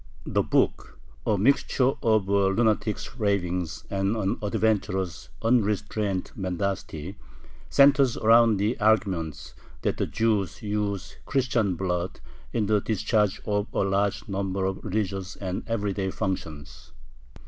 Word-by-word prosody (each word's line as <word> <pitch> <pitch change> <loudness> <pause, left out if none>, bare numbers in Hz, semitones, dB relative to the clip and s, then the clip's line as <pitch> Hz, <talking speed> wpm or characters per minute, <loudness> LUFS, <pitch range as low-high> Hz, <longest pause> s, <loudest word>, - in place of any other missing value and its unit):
The - - +1
book, - - 0 0.3
a 105 - +3
mixture 130 +3 +3
of 110 -4 +2
a 100 0 +3
lunatic's 110 +2 0
ravings 90 -5 -1
and 100 +2 0
an 100 -2 -1
adventurer's 100 -4 -1
unrestrained 105 -4 0
mendacity, 95 -2 -3 0.5
centers 140 -3 +5
around 115 -1 +5
the 105 +6 0
argument, 95 -8 0 0.3
that - - 0
the - - 0
Jews 110 -5 0
use 105 -2 -3
Christian 125 -8 +1
blood 90 0 -2 0.3
in 110 -3 0
the 105 0 +2
discharge 105 -1 0
of 105 -1 0
a - - +1
large 100 +2 0
number 95 -1 -2
of 95 0 -3
religious 95 -3 -2
and 95 -2 -4
everyday 100 -4 -1
functions. 75 -8 -5
100 Hz, 120 wpm, -26 LUFS, 95-110 Hz, 0.5 s, centers